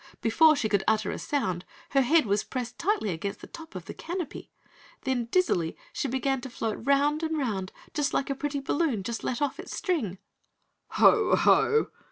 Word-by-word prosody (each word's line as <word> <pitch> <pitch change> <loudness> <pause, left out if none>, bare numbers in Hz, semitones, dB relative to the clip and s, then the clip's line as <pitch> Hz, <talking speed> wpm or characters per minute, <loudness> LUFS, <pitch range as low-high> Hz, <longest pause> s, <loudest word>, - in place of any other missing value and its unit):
Before 310 +8 +5
she 235 - 0
could 200 -2 +1
utter 220 -1 +2
a - - -5
sound, 190 -12 -1 0.3
her 275 - +4
head 305 +3 +4
was 205 0 +1
pressed 245 -2 -5
tightly 355 - +1
against 190 +4 -4
the - - -8
top 320 - -11
of 180 -2 -6
the - - -7
canopy. 350 -2 -6 0.5
Then, 260 -3 0
dizzily, 230 - +1 0.2
she - - -1
began 265 +1 0
to 260 - -7
float 225 -3 -3
'round 285 +3 +2
and 320 -1 -1
'round 205 -9 -2 0.4
like 275 - 0
a - - +2
pretty 285 +1 -3
balloon 275 - 0
just 230 +3 -4
let 255 +3 -1
off 285 - -2
its - - -6
string. 280 - -1 0.8
"Ho, - - +6
Ho!" 445 0 +4
265 Hz, 185 wpm, -28 LUFS, 215-300 Hz, 0.8 s, Ho